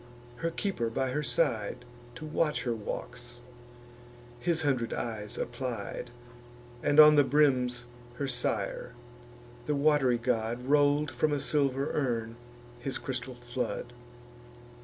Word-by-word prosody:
Her 165 +6 -1
keeper 165 - -2
by 130 +3 -1
her 150 +3 0
side, 120 -2 0 0.3
To 155 - -7
watch 155 0 0
her 120 - 0
walks, 120 +2 -6 1.0
his 170 -2 0
hundred 130 -5 0
eyes 110 -3 -4
applied; 120 -1 -4 0.7
And 145 - +3
on 150 0 +10
the 145 - +7
brims 130 -3 +2 0.3
her 140 +2 -2
sire, 125 -5 -2 0.7
the 150 - +1
wat'ry 140 -4 +3
god, 120 0 -1
Roll'd 145 +1 +3
from 125 +6 +1
a 145 - +1
silver 140 -1 +1
urn 115 -5 -1 0.4
his 130 +2 -3
crystal 130 -1 -5
flood. 120 0 -4
125 Hz, 120 wpm, -30 LUFS, 120-145 Hz, 1.0 s, on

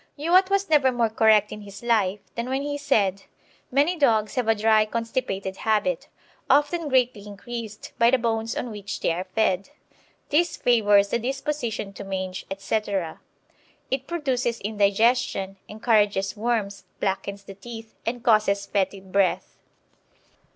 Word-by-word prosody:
Youatt 360 +6 +4
was 395 0 +1
never 290 -4 +4
more 235 -3 0
correct 215 -2 +4
in 210 - -7
his 200 +2 -11
life 210 -4 +1
than 235 +2 -4
when 265 +1 -1
he 290 0 -3
said: 210 -10 +1 0.5
"Many 290 +7 +2
dogs 225 -9 +2
have 250 -3 -1
a 225 - +4
dry 215 0 +4
constipated 215 -4 -3
habit, 245 +6 0 0.4
often 300 +2 +2
greatly 245 -6 +1
increased 215 +1 -7
by 235 0 +6
the 260 - +4
bones 225 -1 -1
on 245 - -3
which 205 -1 -6
they - - +1
are 180 +3 -3
fed. 195 -2 +1 0.6
This 330 +3 +2
favours 205 -4 +4
the 235 - 0
disposition 245 -5 -3
to 200 - -8
mange, 190 -1 -4
etc. 195 -3 -2 0.7
It 265 0 -2
produces 255 -8 -1
indigestion, 205 -1 +1
encourages 210 -3 +1
worms, 215 -3 -2
blackens 200 0 -2
the 195 - -10
teeth, 225 +2 -10
and 235 +1 -3
causes 210 -3 +3
fetid 195 -1 -2
breath." 195 -1 +1
220 Hz, 145 wpm, -24 LUFS, 200-250 Hz, 0.7 s, by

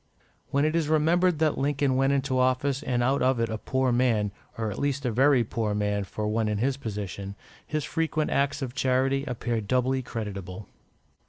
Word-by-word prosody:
When 140 +2 +2
it 155 +1 +1
is 160 -3 +1
remembered 165 +3 +3
that 155 -1 +1
Lincoln 140 -1 +1
went 135 +1 +3
into 135 -2 +1
office 130 +2 +1
and 120 -1 0
out 135 +3 +2
of 130 -1 +2
it 115 - 0
a 110 -1 -3
poor 130 +1 0
man, 120 -4 +2 0.3
or 110 -2 -2
at - - -6
least 140 -1 -1
a 120 - +1
very 130 +2 +4
poor 110 -1 -2
man 105 -1 0
for 105 +2 -4
one 110 +1 0
in 105 -1 0
his 130 +5 +1
position, 100 -5 -5 0.3
his 155 -1 -2
frequent 160 -1 -1
acts 140 +1 0
of 125 -2 -4
charity 130 +2 +1
appear 120 -2 -2
doubly 130 +4 +1
creditable. 100 -5 -6
130 Hz, 190 wpm, -27 LUFS, 110-140 Hz, 0.3 s, very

